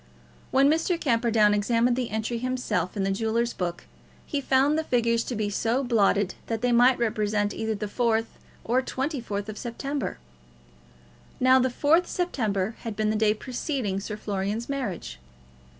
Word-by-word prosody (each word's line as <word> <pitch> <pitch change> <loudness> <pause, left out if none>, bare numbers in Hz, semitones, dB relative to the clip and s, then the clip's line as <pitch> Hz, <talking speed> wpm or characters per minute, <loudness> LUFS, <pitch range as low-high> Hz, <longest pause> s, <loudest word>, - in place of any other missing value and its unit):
When 270 +1 +4
Mr. 325 +3 +1
Camperdown 230 -6 +3
examined 230 +4 +2
the 250 -2 -2
entry 220 +2 -2
himself 230 -8 -2
in 195 - 0
the 195 - 0
jewellers' 225 +3 0
book, 175 -1 -4 0.4
he 285 - -2
found 270 +2 +3
the 320 - 0
figures 235 -4 +1
to 245 - -3
be 210 -1 -1
so 230 +6 0
blotted 205 -5 +2
that 225 -1 -2
they 245 - +2
might 245 +2 +5
represent 210 -2 0
either 220 0 -2
the 210 - -4
4th 225 +1 +1 0.4
or 250 +3 +2
24th 240 -7 -3
September. 275 +5 -4 1.2
Now, 255 +1 +6
the 260 0 +2
4th 315 +7 +3
September 220 - -1
had 225 -3 -5
been 215 0 +1
the - - -1
day 215 0 +3
preceding 245 -4 -3
Sir 210 +1 -5
Florian's 205 +2 -3
marriage. 200 - -4
230 Hz, 155 wpm, -26 LUFS, 210-255 Hz, 1.2 s, Now